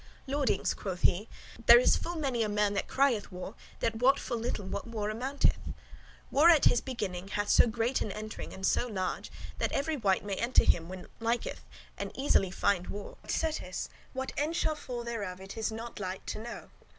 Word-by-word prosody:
"Lordings," 275 -7 +1
quoth 185 -3 -5
he, 205 +6 +2 0.4
"there 235 - +11
is 250 - +5
full 345 - -3
many 270 -7 0
a 215 - +1
man 205 0 +2
that 200 - -1
crieth, 260 -8 +2
'War! 180 0 -7
war!' 205 - -7 0.3
that 225 -1 0
wot 265 +4 +5
full 235 - -3
little 225 -3 -2
what 190 - -4
war 215 -2 -2
amounteth. 260 +6 +1 0.7
War 305 +5 +6
at 320 -4 +6
his - - +5
beginning 195 -8 -4
hath 205 +1 -2
so - - +6
great 230 +3 0
an 210 - -1
entering 215 +2 -6
and 190 - -5
so 245 - +2
large, 190 -5 -3 0.3
that - - 0
every 300 +2 0
wight 200 -5 +1
may 200 - -2
enter 240 +2 +3
when 180 +2 +1
him - - -13
liketh, 230 +1 -1 0.4
and - - -3
lightly 265 - -3
[easily] 195 -9 +3
find 180 0 +1
war: 205 0 -6
but - - -17
certes 305 - -2 0.2
what 265 0 -3
end 305 +3 0
shall 315 - +1
fall 250 -5 -6
thereof 205 -6 -4
it 190 +1 -9
is 225 0 -1
not 230 +1 -7
light 185 -1 -4
to - - -4
know. 235 +2 -8
225 Hz, 205 wpm, -31 LUFS, 200-260 Hz, 0.7 s, there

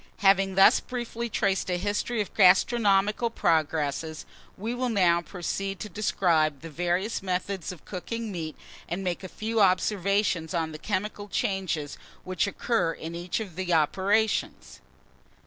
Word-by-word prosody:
HAVING 195 -1 +4
THUS 195 +1 +7
BRIEFLY 235 -1 -5
TRACED 195 -2 0
A 180 - +1
HISTORY 205 +4 -1
OF 205 - -5
GASTRONOMICAL 205 +2 +4
PROGRESSES, 160 -4 0 0.3
we 220 +5 -3
will 250 0 -1
now 180 -6 +3
proceed 195 +2 -4
to 210 - -6
describe 165 -7 +1
the 165 0 -8
various 175 +7 -1
methods 190 -1 -3
of 175 -4 -12
cooking 225 +4 -5
meat, 160 -4 -5 0.3
and 185 +3 -3
make 180 0 -2
a - - -5
few 220 +3 -1
observations 190 -2 +1
on 160 -1 -1
the 155 - -8
chemical 205 +2 -3
changes 190 - -2 0.2
which 185 +1 -1
occur 200 -4 0
in 165 +1 -7
each 175 +4 -3
of 200 -7 -7
the 185 -1 -3
operations. 195 +8 +1
190 Hz, 145 wpm, -27 LUFS, 170-210 Hz, 0.3 s, THUS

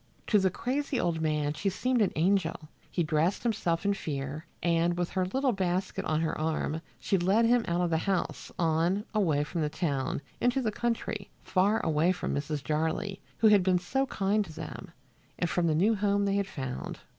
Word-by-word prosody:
To 210 - +4
the 190 -1 +3
crazy 265 +7 -2
old 165 -2 0
man 150 -2 0
she 195 +6 -1
seemed 250 +5 0
an 205 - +3
angel. 165 -2 +1 0.2
He 175 - 0
dressed 155 +4 +1
himself 195 -7 0
in 200 - +3
fear, 145 -3 -4 0.2
and 170 0 +2
with 175 -1 -1
her 185 -1 0
little 265 +6 +1
basket 185 -2 -1
on 155 0 +1
her 165 - 0
arm 160 0 -1 0.2
she 195 - +1
led 195 +6 +3
him 240 0 +4
out 175 +1 +1
of 175 -1 0
the 160 - +2
house, 190 +1 -2
on, 170 +5 +1
away 165 -9 +2
from 165 +3 -3
the 150 - +1
town, 145 -4 -2 0.2
into 245 +2 +2
the 230 -5 0
country, 225 -3 -2
far 200 +4 +2
away 160 +3 +3
from - - -3
Mrs. 145 0 -2
Jarley, 160 +6 -1 0.2
who 220 - +5
had 205 -2 +6
been 180 0 +3
so 270 +10 -1
kind 205 -2 +1
to 160 - -11
them, - - -7 0.5
and 175 - 0
from 170 0 +1
the 155 - +2
new 200 +8 +4
home 200 -1 +1
they 200 - +1
had 200 -1 0
found. 130 -8 -5
180 Hz, 200 wpm, -29 LUFS, 160-205 Hz, 0.5 s, had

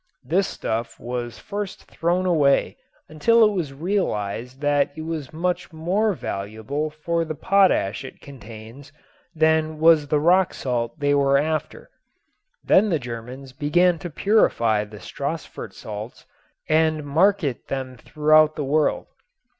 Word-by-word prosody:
This 185 +9 +1
stuff 115 +1 -4
was 120 0 -5
first 205 -1 -6
thrown 175 +2 -1
away 150 -6 +2 0.3
until 220 +10 +4
it 210 - +3
was 175 -8 -3
realized 130 - -2
that 145 -1 +2
it 155 - -6
was 155 -3 -5
much 175 +3 -2
more 185 +7 0
valuable 110 - -4
for 165 +2 -2
the 155 -1 -5
potash 185 - +2
it 130 - -10
contains 120 +1 -12 0.4
than 160 0 +2
was 160 -2 +5
the 150 +1 +1
rock 180 +4 +3
salt 120 0 -3
they 145 0 +2
were 140 -1 +3
after. 155 +1 -3 0.7
Then 210 +3 +4
the 165 - +2
Germans 125 +1 -8
began 165 +5 +2
to 175 - -6
purify 115 - +2
the 105 0 -12
Stassfurt 140 - -6
salts 105 +2 -8 0.4
and 155 -1 +2
market 165 -2 +1
them 130 -1 -4
throughout 155 +4 +3
the 150 - -3
world. 150 +3 +1
150 Hz, 135 wpm, -23 LUFS, 130-165 Hz, 0.7 s, was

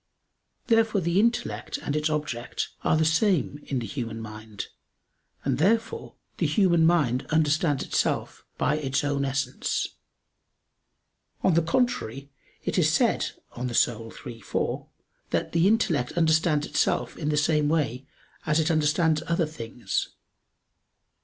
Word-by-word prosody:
Therefore 225 -3 +3
the 170 +1 +1
intellect 125 - 0
and 145 - -3
its 150 +1 +1
object 150 -6 -3
are 155 - +3
the 160 - +3
same 160 -2 +2
in 135 - -1
the 120 - -2
human 115 -3 -4
mind; 110 -2 -7 0.8
and 135 -1 0
therefore 225 +7 +1 0.2
the - - +2
human 170 -6 +4
mind 140 -8 +2
understands 155 -2 +2
itself - - -1
by 150 - +1
its 135 -1 -1
own 145 -1 0
essence. 135 0 -1 1.5
On 185 - +4
the 170 - +4
contrary, 145 - -1 0.3
It - - 0
is - - +4
said - - +2 0.2
(De - - -10
Anima 120 -2 +1 0.2
iii, 115 -3 -8
4) - - -2 0.4
that - - -1
"the 170 +2 +3
intellect 170 - +2
understands 160 -2 +2
itself - - 0
in 150 - -3
the 150 - +1
same 150 -1 +2
way 135 -5 -1 0.4
as 155 +1 +3
it 160 +2 +2
understands 155 0 +2
other 170 0 +2
things." 120 -6 -3
150 Hz, 135 wpm, -26 LUFS, 130-165 Hz, 1.5 s, human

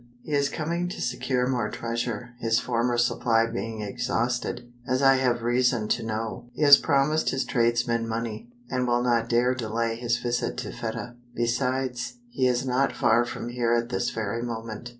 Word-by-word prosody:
"He - - -9
is 140 -1 +2
coming 170 +4 -2
to - - -7
secure 125 +1 0
more 125 -4 0
treasure, 115 0 -4
his 115 0 +2
former 120 0 0
supply 115 -1 +2
being 115 -1 -4
exhausted, 120 +2 -2 0.2
as 130 +2 +1
I 135 0 +6
have 120 -3 +1
reason 120 -2 +2
to - - +1
know. 110 +1 -4
He - - -2
has 145 -1 +10
promised 150 +2 +2
his 135 0 -1
tradesmen 120 -1 +1
money, 115 0 -4 0.2
and 125 -1 -1
will 120 0 +2
not 120 -1 +1
dare 125 +2 +3
delay 115 -1 -2
his 120 0 0
visit 120 0 -2
to - - -4
Fedah. 120 +1 -5 0.2
Besides, 125 0 -1 0.2
he 130 +1 +2
is 125 +1 +1
not 130 +2 +1
far 120 +2 +3
from 120 0 -5
here 120 -1 0
at 115 0 -1
this 120 - -1
very 110 0 -3
moment. 115 -1 -5
120 Hz, 175 wpm, -26 LUFS, 115-125 Hz, 0.2 s, has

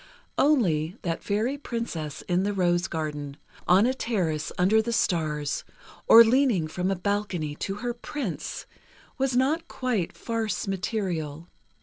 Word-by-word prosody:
Only, 185 - +2
that 165 -2 -2
fairy 225 +7 -1
princess 205 - -4
in 180 0 +1
the 205 +1 0
rose 175 -1 +1
garden—on 155 +4 -1
a 255 - +2
terrace 180 - -1
under 200 +5 +4
the 235 - -3
stars, 155 -9 0 0.4
or 230 - +10
leaning 230 - +3
from 180 +4 -2
a 195 - +1
balcony 190 -5 -2
to 195 - -3
her 240 - 0
Prince, 240 - -5 0.5
was 265 -1 +1
not 295 +6 +1
quite 240 -9 -2
farce 225 -3 -2
material. 180 -5 -3
195 Hz, 130 wpm, -26 LUFS, 165-230 Hz, 0.5 s, or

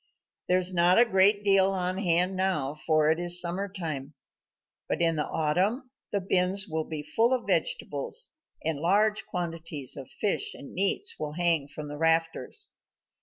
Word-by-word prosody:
There 180 - +3
is 185 0 0
not 175 +1 +4
a 240 - +7
great 200 -1 +4
deal 195 -1 +4
on 185 0 -2
hand 180 0 +2
now, 185 -8 0
for 155 0 +2
it 160 - 0
is 175 0 +4
summer 180 +3 -1
time, 155 -7 -6 0.7
but - - -1
in 165 -1 +2
the 150 - -2
autumn 190 - 0 0.2
the 205 - 0
bins 190 +1 +1
will 160 -2 -2
be 155 -2 -5
full 225 - +1
of 255 - -1
vegetables, - - -1 0.4
and 160 -3 -1
large 205 +6 +2
quantities 165 -6 -3
of 135 - -9
fish 205 - -2
and 140 - -11
meats 200 - +1
will 150 - -4
hang 165 -4 +1
from 150 +1 -8
the 145 0 -7
rafters. 165 -4 0
175 Hz, 170 wpm, -28 LUFS, 160-195 Hz, 0.7 s, a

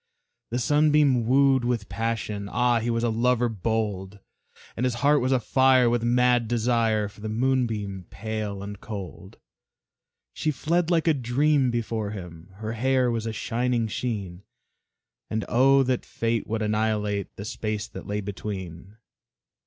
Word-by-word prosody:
The 120 - -2
Sunbeam 145 -2 +3
wooed 135 0 +4
with 120 -4 -1
passion; 105 -1 -3
Ah, 120 0 +2
he 115 +1 -2
was 115 0 0
a 120 - +1
lover 120 +1 +2
bold! 105 -2 -2 0.6
And 120 - -3
his 125 -2 +1
heart 145 0 +5
was 130 +2 0
afire 130 0 +4
with 120 -1 +1
mad 120 0 +3
desire 115 -2 +1
For 105 +1 -15
the 110 - -4
Moonbeam 110 -6 -1
pale 105 -2 -4
and 100 0 -8
cold. 95 -2 -8 1.0
She 155 - -2
fled 165 +4 0
like 170 -2 +2
a 160 - +5
dream 135 +1 +2
before 115 -3 -2
him, 90 -4 -9
Her 110 +2 -5
hair 130 +1 +2
was 115 -1 -2
a - - -1
shining 120 +1 -1
sheen, 100 -6 -4 0.9
And 110 0 -2
oh, 135 +3 +4
that 130 -1 -1
Fate 115 0 -2
would 110 0 -2
annihilate 105 -1 -1
The 100 - -7
space 110 -1 -3
that - - -9
lay 105 +1 -2
between! 95 -1 -7
115 Hz, 150 wpm, -25 LUFS, 105-125 Hz, 1.0 s, heart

